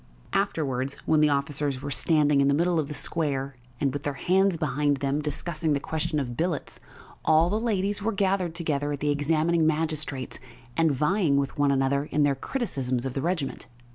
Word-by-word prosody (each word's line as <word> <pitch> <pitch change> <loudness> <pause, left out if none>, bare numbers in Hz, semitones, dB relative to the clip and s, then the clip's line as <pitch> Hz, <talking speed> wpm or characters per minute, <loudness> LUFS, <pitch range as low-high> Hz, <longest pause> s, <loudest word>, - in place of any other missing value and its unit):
Afterwards, 140 -9 -1
when 155 -1 +3
the 150 - +5
officers 140 -1 -1
were 140 +1 -5
standing 150 -1 +3
in 140 - +3
the 140 - +3
middle 170 +2 +2
of 150 - -1
the 150 - -5
square, 140 -5 -2 0.2
and, 140 -2 +1
with 145 - -3
their 145 -1 -3
hands 190 +4 +2
behind 150 -2 +1
them, 140 +2 -1
discussing 155 +1 -1
the 140 - +1
question 160 +2 -2
of 120 -4 -3
billets, 165 +1 -2 0.4
all 160 +3 +4
the 215 - +1
ladies 205 -3 -1
were 225 +2 0
gathered 190 -4 0
together 145 -4 -1
at 145 - -3
the 145 +1 +1
examining 155 +3 +2
magistrate's 155 -4 -2 0.4
and 165 -1 +3
vying 150 +2 +2
with 140 -1 -1
one 145 -1 +2
another 140 +1 +1
in 150 0 +1
their 145 -1 +3
criticisms 135 - -2
of 130 - -3
the 135 - -2
regiment. 160 -4 -2
150 Hz, 190 wpm, -26 LUFS, 140-165 Hz, 0.4 s, the